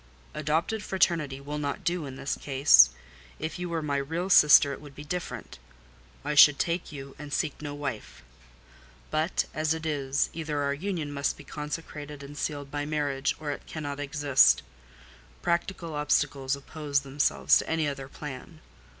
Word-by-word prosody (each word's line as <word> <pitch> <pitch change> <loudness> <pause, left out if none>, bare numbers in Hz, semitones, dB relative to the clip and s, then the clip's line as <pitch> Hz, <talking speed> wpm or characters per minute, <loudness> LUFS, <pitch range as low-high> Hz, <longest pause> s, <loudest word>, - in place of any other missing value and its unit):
"Adopted 160 +9 -1
fraternity 165 -9 +1
will 145 +2 -5
not 145 -1 -3
do 170 -4 -1
in 130 - -8
this 135 +1 -3
case. 135 - +6 0.5
If 160 +3 -5
you 180 0 -3
were 165 -2 -2
my 145 -2 0
real 165 +7 -2
sister 145 -3 +7
it - - -9
would 145 -2 -12
be 145 - -8
different: 175 - -6 0.7
I - - 0
should 150 -1 +8
take 170 0 -1
you, 135 -2 -9
and 145 -1 -8
seek 145 +1 -2
no 145 -1 -5
wife. 140 - -6 0.9
But 155 +4 0
as 155 +1 0
it 160 0 -7
is, 140 -3 0
either 155 -2 -3
our 140 0 +1
union 165 -1 -3
must 140 0 -1
be - - -11
consecrated 150 0 -6
and 140 +1 -10
sealed 145 -2 -4
by 145 0 -2
marriage, 145 -2 -1
or 150 -2 -3
it - - -7
cannot 145 -2 -5
exist: 140 - +4 0.8
practical 170 -1 -1
obstacles 145 -2 +1
oppose 140 0 -2
themselves 140 +1 +3
to - - -5
any 160 -2 +1
other 135 -2 -4
plan. 145 +3 -9
145 Hz, 165 wpm, -28 LUFS, 140-155 Hz, 0.9 s, should